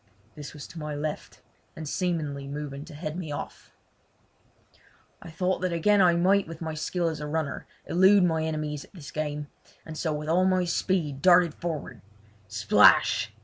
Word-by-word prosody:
This 150 Hz, +1 st, -9 dB
was 145 Hz, -, -8 dB
to 165 Hz, -, -9 dB
my 150 Hz, -1 st, -4 dB
left, 150 Hz, +1 st, -5 dB, 0.3 s
and 155 Hz, -1 st, -7 dB
seemingly 150 Hz, -5 st, -2 dB
moving 145 Hz, 0 st, -6 dB
to 160 Hz, -2 st, -11 dB
head 155 Hz, 0 st, -5 dB
me 170 Hz, -4 st, -5 dB
off. 145 Hz, -, -7 dB, 1.5 s
I -, -, -10 dB
thought 180 Hz, +3 st, -1 dB
that 185 Hz, -1 st, 0 dB
again 200 Hz, +5 st, +3 dB
I 175 Hz, -2 st, +5 dB
might 190 Hz, +3 st, +3 dB
with 165 Hz, -1 st, -8 dB
my 160 Hz, -1 st, -4 dB
skill 170 Hz, +3 st, -2 dB
as 160 Hz, -2 st, -3 dB
a 150 Hz, -, -5 dB
runner 155 Hz, -1 st, -3 dB, 0.2 s
elude 190 Hz, +2 st, +5 dB
my 160 Hz, -2 st, +1 dB
enemies 155 Hz, -2 st, -3 dB
at -, -, -20 dB
this 160 Hz, -6 st, -10 dB
game, 150 Hz, -1 st, -3 dB, 0.4 s
and 160 Hz, -, -8 dB
so 160 Hz, 0 st, -2 dB
with 150 Hz, 0 st, -4 dB
all 175 Hz, +3 st, +3 dB
my 185 Hz, -1 st, +2 dB
speed 165 Hz, -6 st, -1 dB
darted 175 Hz, -2 st, +5 dB
forward. 165 Hz, -3 st, -5 dB, 0.5 s
Splash! 110 Hz, +1 st, +4 dB
160 Hz, 175 wpm, -27 LUFS, 150-175 Hz, 1.5 s, I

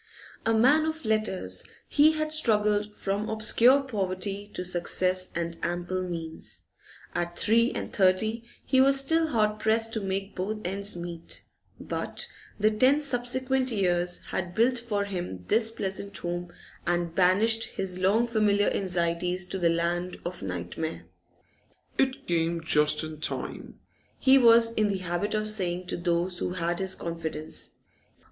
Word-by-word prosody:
A 225 Hz, -, +3 dB
man 280 Hz, +8 st, +4 dB
of 320 Hz, 0 st, -4 dB
letters, 215 Hz, -3 st, +1 dB, 0.2 s
he 300 Hz, +2 st, +4 dB
had 310 Hz, 0 st, -2 dB
struggled 210 Hz, -6 st, +1 dB
from 200 Hz, +2 st, -2 dB
obscure 230 Hz, +5 st, +4 dB
poverty 200 Hz, -3 st, -3 dB
to 180 Hz, -, -3 dB
success 185 Hz, +1 st, +1 dB
and 170 Hz, 0 st, -4 dB
ample 175 Hz, +2 st, -2 dB
means; 165 Hz, -3 st, -6 dB, 0.5 s
at 175 Hz, 0 st, -3 dB
three 230 Hz, +3 st, +3 dB
and -, -, -5 dB
thirty 215 Hz, +4 st, +2 dB, 0.2 s
he 260 Hz, -, +3 dB
was 275 Hz, +1 st, +5 dB
still 320 Hz, +4 st, +4 dB
hard 215 Hz, -6 st, 0 dB
pressed 225 Hz, +1 st, 0 dB
to 220 Hz, -, -1 dB
make 195 Hz, +1 st, -4 dB
both 205 Hz, +4 st, -3 dB
ends 200 Hz, +1 st, +1 dB
meet, 170 Hz, -1 st, -4 dB, 0.4 s
but -, -, -3 dB, 0.3 s
the 215 Hz, +1 st, +3 dB
ten 255 Hz, +7 st, +4 dB
subsequent 260 Hz, -1 st, +1 dB
years 175 Hz, -4 st, +1 dB
had 175 Hz, -1 st, -4 dB
built 240 Hz, +2 st, +2 dB
for 210 Hz, -4 st, -2 dB
him 175 Hz, -, -6 dB
this 225 Hz, -1 st, +3 dB
pleasant 200 Hz, -2 st, -4 dB
home 175 Hz, 0 st, -4 dB, 0.4 s
and 175 Hz, -1 st, 0 dB
banished 205 Hz, +6 st, +3 dB
his 185 Hz, -1 st, -4 dB
long 200 Hz, +6 st, +3 dB
familiar 210 Hz, -3 st, +2 dB
anxieties 180 Hz, -1 st, -1 dB
to 190 Hz, +1 st, -5 dB
the 170 Hz, -2 st, +3 dB
land 175 Hz, +2 st, -1 dB
of 180 Hz, +1 st, -5 dB
nightmare. 95 Hz, -, -5 dB, 0.9 s
'It 265 Hz, 0 st, 0 dB
came 170 Hz, 0 st, 0 dB
just 150 Hz, -1 st, +4 dB
in 155 Hz, -1 st, -7 dB
time,' -, -, -5 dB, 0.4 s
he 270 Hz, 0 st, +5 dB
was 230 Hz, -1 st, +6 dB
in 215 Hz, -2 st, +1 dB
the 200 Hz, -1 st, -1 dB
habit 185 Hz, +3 st, -2 dB
of 215 Hz, 0 st, -1 dB
saying 185 Hz, -4 st, 0 dB
to -, -, -3 dB
those 175 Hz, +1 st, -1 dB
who 180 Hz, -, -2 dB
had 175 Hz, -1 st, -2 dB
his 190 Hz, 0 st, 0 dB
confidence. 160 Hz, -2 st, -3 dB
195 Hz, 150 wpm, -27 LUFS, 175-225 Hz, 0.9 s, was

